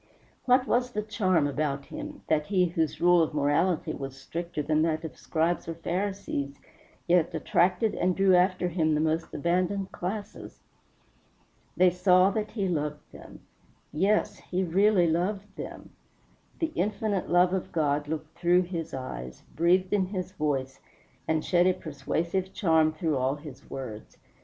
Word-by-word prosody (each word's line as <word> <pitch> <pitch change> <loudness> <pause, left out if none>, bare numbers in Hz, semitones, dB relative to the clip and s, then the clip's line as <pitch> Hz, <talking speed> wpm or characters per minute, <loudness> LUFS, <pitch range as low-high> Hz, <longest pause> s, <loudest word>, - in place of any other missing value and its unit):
What 255 0 +4
was 245 0 0
the 210 - -1
charm 190 -7 +1
about 145 -1 -2
him, 300 -1 -8
that 150 -1 +1
he 185 -3 +3
whose 165 -3 -1
rule 175 0 +5
of 160 -1 -1
morality 155 +4 +1
was 135 -1 -7
stricter 165 +2 -4
than 155 +1 +1
that 160 0 0
of 160 - -7
Scribes 165 +2 -1
or 165 - -4
Pharisees 170 -5 -3 0.5
yet 170 -2 +2
attracted 180 +6 +2
and 180 0 0
drew 195 -1 +4
after 180 0 +2
him 160 -3 +1
the - - +1
most 160 +1 0
abandoned 185 +4 -1
classes? 200 +3 -6 1.1
They 180 0 +5
saw 180 +1 +4
that 215 +1 -2
he 200 -4 -2
loved 150 -3 -3
them. - - -13 0.5
Yes, 195 +7 +1
he 185 +1 -2
really 190 +1 +3
loved 190 +5 -1
them. - - -8 0.7
The 325 -1 -1
infinite 205 0 -1
love 180 +1 +4
of 190 - -2
God 145 -2 0
looked 155 0 -5
through 175 +1 +3
his 170 -4 -5
eyes, 65 - -7
breathed 180 +3 +2
in 190 -3 +2
his 185 -2 -4
voice, 140 -6 -2 0.5
and 160 -1 0
shed 175 0 +3
a 185 - +4
persuasive 170 +5 -3
charm 160 -5 +3
through 155 -2 -1
all 130 +2 0
his 145 -3 -12
words. 115 -5 -8
175 Hz, 155 wpm, -28 LUFS, 155-190 Hz, 1.1 s, rule